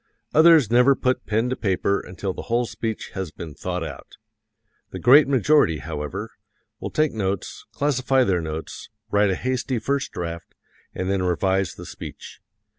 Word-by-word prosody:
Others 155 Hz, -7 st, +6 dB
never 125 Hz, +3 st, +5 dB
put 130 Hz, 0 st, -1 dB
pen 110 Hz, +3 st, +1 dB
to -, -, 0 dB
paper 100 Hz, -2 st, 0 dB
until 95 Hz, +1 st, -5 dB
the -, -, -6 dB
whole 120 Hz, +1 st, +2 dB
speech 110 Hz, -1 st, -5 dB
has 95 Hz, -3 st, -4 dB
been 80 Hz, 0 st, -9 dB
thought 90 Hz, +2 st, -4 dB
out. -, -, -9 dB, 0.8 s
The -, -, -7 dB
great 140 Hz, +4 st, +6 dB
majority, 135 Hz, -, +3 dB
however, 80 Hz, +8 st, -5 dB, 0.5 s
will -, -, -4 dB
take 155 Hz, -1 st, +1 dB
notes, 100 Hz, -3 st, -3 dB
classify 135 Hz, -2 st, +1 dB
their 95 Hz, -6 st, +1 dB
notes, 80 Hz, 0 st, -6 dB, 0.2 s
write 105 Hz, 0 st, +3 dB
a 95 Hz, -, +1 dB
hasty 130 Hz, +2 st, -2 dB
first 135 Hz, +4 st, -1 dB
draft, 85 Hz, -1 st, -6 dB, 0.4 s
and 95 Hz, -, -3 dB
then 95 Hz, -1 st, 0 dB
revise 95 Hz, +1 st, 0 dB
the -, -, -10 dB
speech. -, -, -10 dB
105 Hz, 160 wpm, -23 LUFS, 90-130 Hz, 0.8 s, Others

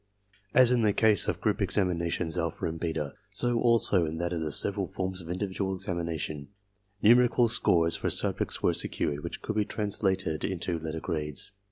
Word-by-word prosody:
As 130 Hz, -1 st, +6 dB
in 125 Hz, -1 st, +3 dB
the 105 Hz, -2 st, +3 dB
case 110 Hz, -3 st, +3 dB
of -, -, -1 dB
group -, -, 0 dB
examinations 85 Hz, -3 st, 0 dB
alpha 85 Hz, -2 st, -2 dB
and 80 Hz, 0 st, -3 dB
beta, 80 Hz, -4 st, -3 dB, 0.2 s
so 120 Hz, +3 st, 0 dB
also 115 Hz, -6 st, +3 dB
in 80 Hz, 0 st, -3 dB
that 85 Hz, +1 st, -2 dB
of 85 Hz, -, -2 dB
the 75 Hz, -1 st, -2 dB
several -, -, +1 dB
forms 95 Hz, 0 st, -4 dB
of 85 Hz, -, -11 dB
individual 95 Hz, +1 st, -2 dB
examination, 85 Hz, -5 st, -4 dB, 0.6 s
numerical 120 Hz, +2 st, +5 dB
scores 85 Hz, -7 st, +3 dB
for -, -, -2 dB
subjects -, -, 0 dB
were -, -, +3 dB
secured 75 Hz, 0 st, -2 dB
which -, -, -6 dB
could 110 Hz, -, -3 dB
be 105 Hz, -, +2 dB
translated 95 Hz, -7 st, -1 dB
into 85 Hz, -2 st, -2 dB
letter 80 Hz, 0 st, -5 dB
grades. 75 Hz, -1 st, -3 dB
90 Hz, 175 wpm, -28 LUFS, 80-105 Hz, 0.6 s, As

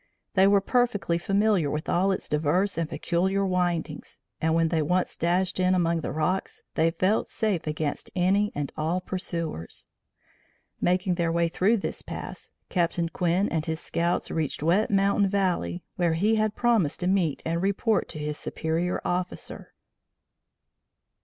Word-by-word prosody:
They 190 Hz, 0 st, +5 dB
were 200 Hz, 0 st, +5 dB
perfectly 205 Hz, -7 st, +1 dB
familiar 195 Hz, -4 st, +2 dB
with 150 Hz, +2 st, -3 dB
all 190 Hz, +3 st, +2 dB
its 190 Hz, -, -3 dB
diverse 160 Hz, +7 st, +1 dB
and 165 Hz, -2 st, -2 dB
peculiar 190 Hz, +3 st, 0 dB
windings, 175 Hz, -4 st, -2 dB, 0.2 s
and, 160 Hz, 0 st, +2 dB
when 165 Hz, -1 st, +3 dB
they 165 Hz, -2 st, +1 dB
once 180 Hz, +4 st, 0 dB
dashed 180 Hz, +3 st, 0 dB
in 185 Hz, 0 st, +3 dB
among 170 Hz, -2 st, +1 dB
the -, -, -3 dB
rocks, 160 Hz, +5 st, -2 dB
they 160 Hz, +1 st, +3 dB
felt 185 Hz, +5 st, +1 dB
safe 210 Hz, -8 st, -1 dB
against 150 Hz, -1 st, -3 dB
any 195 Hz, +3 st, +2 dB
and 145 Hz, -1 st, -3 dB
all 160 Hz, +4 st, 0 dB
pursuers. 170 Hz, -, -5 dB, 1.0 s
Making 180 Hz, +1 st, +2 dB
their 170 Hz, -1 st, 0 dB
way 170 Hz, 0 st, +2 dB
through 205 Hz, +7 st, +2 dB
this 195 Hz, -, -4 dB
pass, -, -, -7 dB, 0.2 s
Captain 170 Hz, -1 st, 0 dB
Quinn 180 Hz, +4 st, +1 dB
and 160 Hz, -1 st, -2 dB
his 160 Hz, 0 st, -2 dB
scouts 170 Hz, +1 st, -1 dB
reached 155 Hz, -2 st, -2 dB
Wet 180 Hz, +7 st, +3 dB
Mountain 200 Hz, 0 st, +3 dB
Valley, 180 Hz, -, 0 dB
where 175 Hz, -2 st, +2 dB
he 205 Hz, +7 st, +2 dB
had 215 Hz, -1 st, +1 dB
promised 225 Hz, -12 st, +2 dB
to -, -, -1 dB
meet 185 Hz, -6 st, +1 dB
and 165 Hz, +1 st, -1 dB
report 200 Hz, +2 st, +1 dB
to -, -, -7 dB
his 150 Hz, 0 st, -4 dB
superior 165 Hz, +3 st, -2 dB
officer. 180 Hz, 0 st, -3 dB
180 Hz, 155 wpm, -26 LUFS, 165-195 Hz, 1.0 s, They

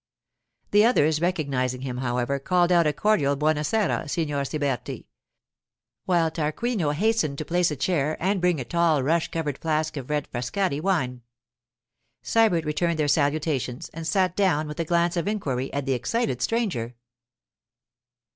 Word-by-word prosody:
The 205 Hz, +1 st, +6 dB
others, 160 Hz, -10 st, +3 dB
recognizing 135 Hz, -8 st, -1 dB
him, 130 Hz, -2 st, -4 dB
however, 125 Hz, +2 st, -1 dB
called 175 Hz, +4 st, +2 dB
out 170 Hz, -3 st, +4 dB
a -, -, +3 dB
cordial 150 Hz, -3 st, +2 dB
'Buona 150 Hz, +1 st, +1 dB
sera, 200 Hz, -3 st, 0 dB
Signor 145 Hz, -3 st, -1 dB
Siberti,' 140 Hz, -4 st, -3 dB, 1.0 s
while 170 Hz, -3 st, +2 dB
Tarquinio 165 Hz, +4 st, -1 dB
hastened 175 Hz, -2 st, +1 dB
to 155 Hz, -, -4 dB
place 175 Hz, +2 st, +2 dB
a 150 Hz, -, -3 dB
chair 150 Hz, +1 st, 0 dB
and 190 Hz, +1 st, 0 dB
bring 175 Hz, -4 st, +2 dB
a 125 Hz, -, -4 dB
tall 165 Hz, -2 st, +2 dB
rush 165 Hz, +4 st, +1 dB
covered 150 Hz, -4 st, -3 dB
flask 155 Hz, -1 st, -1 dB
of 130 Hz, -1 st, -6 dB
red 150 Hz, -1 st, -1 dB
Frascati 140 Hz, +6 st, -1 dB
wine. 155 Hz, -10 st, 0 dB, 1.0 s
Sybert 210 Hz, -8 st, +2 dB
returned 165 Hz, +2 st, 0 dB
their 150 Hz, -2 st, +1 dB
salutations, 145 Hz, -4 st, 0 dB
and 165 Hz, 0 st, -7 dB
sat 185 Hz, 0 st, +1 dB
down 170 Hz, -7 st, +1 dB
with 150 Hz, +2 st, -7 dB
a 165 Hz, -, 0 dB
glance 170 Hz, +1 st, +1 dB
of 170 Hz, 0 st, -1 dB
inquiry 135 Hz, -12 st, -2 dB
at 140 Hz, -1 st, -3 dB
the 135 Hz, -, +1 dB
excited 130 Hz, -, -1 dB
stranger. 180 Hz, -, -1 dB
155 Hz, 155 wpm, -25 LUFS, 140-175 Hz, 1.0 s, The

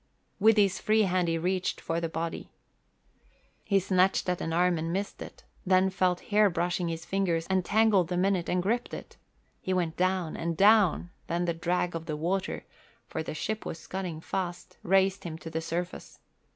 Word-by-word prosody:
With 220 Hz, +2 st, +5 dB
his 200 Hz, -2 st, +3 dB
free 215 Hz, 0 st, +3 dB
hand 185 Hz, -2 st, +1 dB
he 165 Hz, 0 st, +1 dB
reached 185 Hz, +2 st, -1 dB
for 165 Hz, +1 st, -2 dB
the 165 Hz, -, -2 dB
body. 165 Hz, +1 st, -4 dB, 1.1 s
He 200 Hz, -2 st, +2 dB
snatched 185 Hz, 0 st, +2 dB
at 180 Hz, -, -1 dB
an 165 Hz, -, -2 dB
arm 175 Hz, 0 st, +2 dB
and 165 Hz, +1 st, -2 dB
missed 195 Hz, +3 st, -3 dB
it, -, -, -10 dB, 0.2 s
then 190 Hz, 0 st, +3 dB
felt 180 Hz, -1 st, +1 dB
hair 210 Hz, 0 st, +5 dB
brushing 175 Hz, 0 st, -1 dB
his 165 Hz, -1 st, -4 dB
fingers 175 Hz, -4 st, 0 dB
and 190 Hz, -1 st, +2 dB
tangled 205 Hz, -3 st, +3 dB
them 180 Hz, +1 st, 0 dB
in 195 Hz, 0 st, +3 dB
it 175 Hz, -2 st, -3 dB
and 180 Hz, 0 st, +1 dB
gripped 235 Hz, +5 st, -1 dB
it. -, -, -10 dB, 0.4 s
He 185 Hz, -, -1 dB
went 170 Hz, -3 st, -1 dB
down 185 Hz, -2 st, 0 dB
and 165 Hz, -1 st, -3 dB
down; 200 Hz, -4 st, +4 dB, 0.2 s
then 175 Hz, +1 st, -1 dB
the 170 Hz, -, 0 dB
drag 175 Hz, +1 st, -1 dB
of 165 Hz, -1 st, -5 dB
the 155 Hz, -2 st, -3 dB
water, 180 Hz, +5 st, -2 dB, 0.4 s
for 160 Hz, -, -4 dB
the 160 Hz, -, -5 dB
ship 215 Hz, +7 st, -3 dB
was -, -, -5 dB
scudding 175 Hz, -1 st, -5 dB
fast, 180 Hz, +1 st, -4 dB
raised 195 Hz, +1 st, +2 dB
him 160 Hz, -2 st, -5 dB
to 165 Hz, 0 st, -9 dB
the 160 Hz, -, -2 dB
surface. 175 Hz, +2 st, -5 dB
180 Hz, 190 wpm, -28 LUFS, 165-190 Hz, 1.1 s, With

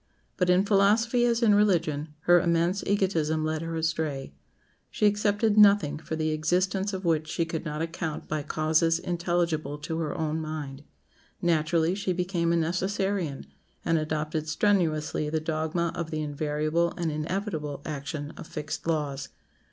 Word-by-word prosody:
But 180 Hz, -2 st, +1 dB
in 180 Hz, +2 st, +4 dB
philosophy 220 Hz, +4 st, +3 dB
as 235 Hz, 0 st, +1 dB
in 215 Hz, -3 st, +5 dB
religion, 165 Hz, -7 st, +1 dB
her 175 Hz, +2 st, +5 dB
immense 170 Hz, +2 st, +1 dB
egotism 165 Hz, -6 st, +1 dB
led 155 Hz, 0 st, -1 dB
her 165 Hz, 0 st, -4 dB
astray. 160 Hz, -, -2 dB, 0.6 s
She -, -, 0 dB
accepted 205 Hz, +1 st, +3 dB
nothing 200 Hz, -8 st, +5 dB
for 160 Hz, -, -5 dB
the 155 Hz, 0 st, 0 dB
existence 180 Hz, +5 st, 0 dB
of 190 Hz, -1 st, -5 dB
which 160 Hz, -2 st, +1 dB
she 165 Hz, +2 st, -1 dB
could 160 Hz, 0 st, -4 dB
not 150 Hz, 0 st, -2 dB
account 165 Hz, -2 st, -4 dB
by 155 Hz, 0 st, -2 dB
causes 160 Hz, +2 st, +2 dB
intelligible 170 Hz, -4 st, -1 dB
to 160 Hz, +2 st, -4 dB
her 160 Hz, -2 st, -2 dB
own 160 Hz, 0 st, -1 dB
mind. 150 Hz, -3 st, -6 dB, 0.6 s
Naturally 165 Hz, 0 st, +2 dB
she 195 Hz, -1 st, -1 dB
became 180 Hz, -1 st, 0 dB
a -, -, +3 dB
Necessarian, 185 Hz, -2 st, -1 dB, 0.4 s
and 165 Hz, -1 st, +2 dB
adopted 155 Hz, 0 st, -2 dB
strenuously 155 Hz, -4 st, +1 dB
the 160 Hz, +1 st, 0 dB
dogma 160 Hz, +2 st, -1 dB
of 170 Hz, -2 st, -4 dB
the 155 Hz, -1 st, -2 dB
invariable 155 Hz, +3 st, -1 dB
and 170 Hz, -2 st, -1 dB
inevitable 155 Hz, -2 st, -3 dB
action 145 Hz, 0 st, -5 dB
of -, -, -9 dB
fixed 150 Hz, +1 st, -5 dB
laws. 145 Hz, -4 st, -1 dB
165 Hz, 150 wpm, -27 LUFS, 155-180 Hz, 0.6 s, in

